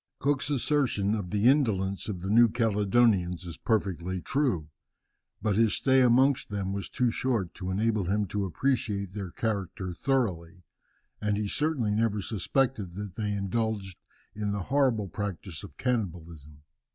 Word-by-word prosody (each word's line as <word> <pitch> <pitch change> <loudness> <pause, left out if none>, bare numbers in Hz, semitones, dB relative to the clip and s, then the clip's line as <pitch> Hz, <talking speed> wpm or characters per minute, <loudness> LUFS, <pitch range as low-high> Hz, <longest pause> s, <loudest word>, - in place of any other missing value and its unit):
Cook's 140 0 0
assertion 130 -7 +1
of 100 -5 -3
the 105 +3 +2
indolence 100 -9 +2
of 95 -4 -4
the 95 +2 -2
New 115 +1 +6
Caledonians 105 -5 +2
is 85 - -7
perfectly 95 -4 -1
true. 110 - 0 0.8
But 105 -2 +1
his 115 -1 +3
stay 130 -1 +3
amongst 130 +2 +4
them 100 -1 -2
was 100 0 -4
too 125 -2 +1
short 115 -8 -1
to 95 -1 -6
enable 105 +1 +1
him 105 +3 +1
to 100 0 -1
appreciate 100 - -1
their 100 -3 -5
character 95 -3 -3
thoroughly; 90 -8 -1 0.6
and 105 -1 0
he 105 -1 -1
certainly 145 -3 0
never 110 -1 +1
suspected 105 -1 -1
that 100 -2 -6
they 105 +1 -2
indulged 100 -2 -2 0.3
in 105 -1 -2
the 100 -2 -2
horrible 125 -4 +1
practice 95 -2 -5
of 100 - -11
cannibalism. 85 - -3
105 Hz, 150 wpm, -28 LUFS, 95-120 Hz, 0.8 s, New